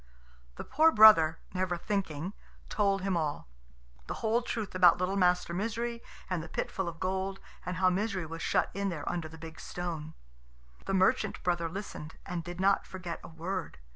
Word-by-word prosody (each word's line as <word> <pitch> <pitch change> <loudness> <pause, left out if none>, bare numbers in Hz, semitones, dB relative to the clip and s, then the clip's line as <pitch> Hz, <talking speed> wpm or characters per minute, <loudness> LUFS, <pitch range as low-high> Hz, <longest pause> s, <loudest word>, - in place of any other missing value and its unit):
The - - -6
poor 315 +4 +4
brother, 210 - +8 0.2
never 185 -1 -1
thinking, 185 -2 -2 0.4
told 200 -2 +1
him 195 -2 0
all 150 - -2 0.6
the - - -3
whole 230 +2 +1
truth 225 -3 -4
about 180 -2 +6
little 185 +2 -1
Master 180 -2 +2
Misery 230 +4 -2 0.3
and 180 -3 -1
the 160 - -9
pit - - -3
full 190 -2 -2
of 165 -1 -10
gold, 190 +1 -2 0.2
and 180 0 -4
how 185 0 +4
Misery 195 -2 -1
was 165 +1 -7
shut - - +1
in 200 0 -1
there 155 -5 -5
under 170 -2 -2
the 160 - -11
big 160 -1 -10
stone. 160 -3 -5 0.7
The 195 - +1
merchant 190 0 +2
brother 170 -2 0
listened, 170 -4 -7
and 175 -2 -4
did 175 +1 -7
not 195 +1 +3
forget 180 -3 -6
a - - -8
word. 170 +2 -5
185 Hz, 180 wpm, -30 LUFS, 165-195 Hz, 0.7 s, brother